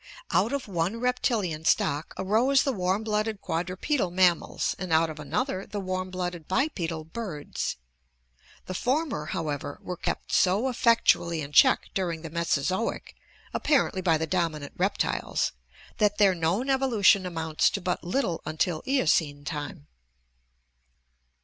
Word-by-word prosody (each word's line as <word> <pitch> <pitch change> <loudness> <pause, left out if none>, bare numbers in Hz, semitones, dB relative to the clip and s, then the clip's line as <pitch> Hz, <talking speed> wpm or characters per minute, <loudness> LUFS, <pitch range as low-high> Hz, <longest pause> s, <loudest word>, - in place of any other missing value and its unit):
Out 225 - +2
of 280 -4 -3
one 185 +4 -1
reptilian 225 -10 0
stock 150 -1 +1
arose 230 +8 +3
the 275 - 0
warm 190 +1 0
blooded 215 -1 -1
quad 170 0 -2
rupedal 190 - -1
mammals, 180 -1 +2
and 185 -3 -5
out 160 0 +3
of 155 - -10
another 195 - -2
the 205 - -4
warm 185 -1 -3
blooded 180 -3 -4
bipedal 180 - -1
birds. 160 -3 -4 0.9
The 185 - -5
former, 255 - -1
however, 150 -5 -3
were 180 - -4
kept - - -4
so 200 +8 +3
effectually 230 -9 +3
in 140 0 -6
check 145 - +5
dur 185 -3 0
ing 160 0 -8
the 165 - -7
Mesozoic, 170 +5 -1 0.4
apparently 270 -10 +1
by 165 -4 +3
the 160 - -1
dominant 160 -4 -2
reptiles, 195 +3 0 0.5
that 210 -1 +2
their 200 -3 +5
known 175 +9 0
evolution 225 -8 +4
amounts 160 -2 +1
to - - -3
but 180 -1 -2
little 180 -2 -1
until 155 +1 -1
Eocene 160 - +1
time. 145 0 -5
185 Hz, 140 wpm, -27 LUFS, 160-215 Hz, 0.9 s, check